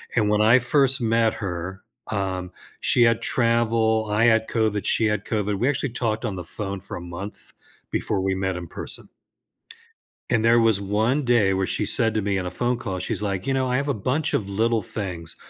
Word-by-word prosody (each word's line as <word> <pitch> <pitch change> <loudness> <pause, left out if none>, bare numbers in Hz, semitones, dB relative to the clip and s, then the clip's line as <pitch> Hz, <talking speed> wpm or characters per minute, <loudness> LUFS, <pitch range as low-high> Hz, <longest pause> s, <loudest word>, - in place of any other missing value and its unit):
and 105 -3 +2
when 105 0 +2
I 115 +4 +6
first 135 +1 +3
met 115 -1 +2
her, 95 0 -5 0.3
um, 95 -3 -2 0.3
she 120 - +4
had 115 -1 +3
travel 115 -2 +2
I 105 +3 +3
had 110 -1 +3
COVID; 110 -3 0
she 115 - +2
had 105 -1 -1
COVID, 105 -2 -1
we 125 - +1
actually 135 -2 -1
talked 115 -1 -1
on 105 -4 -3
the 90 - -6
phone 100 +1 -5
for - - -7
a 85 - -8
month 85 +4 -8 0.4
before 95 - -1
we 95 0 0
met 95 -1 -2
in 85 -1 -7
person. - - -6 1.2
And 115 -1 +1
there 115 +1 +5
was 115 -3 +3
1 110 +8 0
day 110 -6 +3
where 95 0 -1
she - - -1
said 115 -1 +3
to 110 - 0
me, 100 0 0
in 90 -1 -2
a - - -3
phone 120 +7 -1
call, 95 -6 -4
she's 90 - -2
like, 100 0 -2
"You 135 - +1
know, 130 -1 0
I 125 - +1
have 140 - -1
a 140 - +1
bunch 125 +8 -1
of 100 -3 -1
little 110 +2 +1
things 90 -7 -5
110 Hz, 215 wpm, -23 LUFS, 95-115 Hz, 1.2 s, I